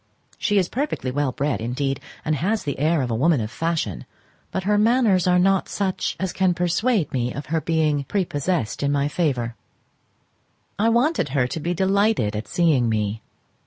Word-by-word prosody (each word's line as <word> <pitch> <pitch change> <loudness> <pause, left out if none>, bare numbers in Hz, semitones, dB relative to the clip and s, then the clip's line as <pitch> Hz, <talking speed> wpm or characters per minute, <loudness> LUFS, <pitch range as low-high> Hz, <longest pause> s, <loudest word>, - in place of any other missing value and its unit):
She 205 -2 +1
is 185 -3 +3
perfectly 255 - -2
well 145 0 0
bred, 135 -4 -1
indeed, 135 +4 -2 0.3
and 155 - +1
has 210 +9 0
the 140 -3 -4
air 155 0 +2
of 125 - -3
a - - 0
woman 150 +4 +3
of 110 0 -4
fashion, 160 - -2 0.4
but 190 - -3
her 210 +2 +2
manners 210 -4 +3
are 180 0 +4
not 195 +1 +2
such 195 -2 -2
as 190 -1 -2
can 185 -2 +2
persuade 180 - +1
me 125 -1 0
of 145 +2 -6
her 160 - +2
being 155 -4 +1
prepossessed 170 - -1
in 140 0 +1
my 140 0 +1
favour. 135 -8 -1 1.3
I 225 +2 +3
wanted 250 - +2
her 130 -2 +1
to 125 - -4
be 175 +3 -2
delighted 195 - +2
at 105 0 -4
seeing 145 -6 +2
me. 105 0 -1
160 Hz, 180 wpm, -23 LUFS, 130-190 Hz, 1.3 s, are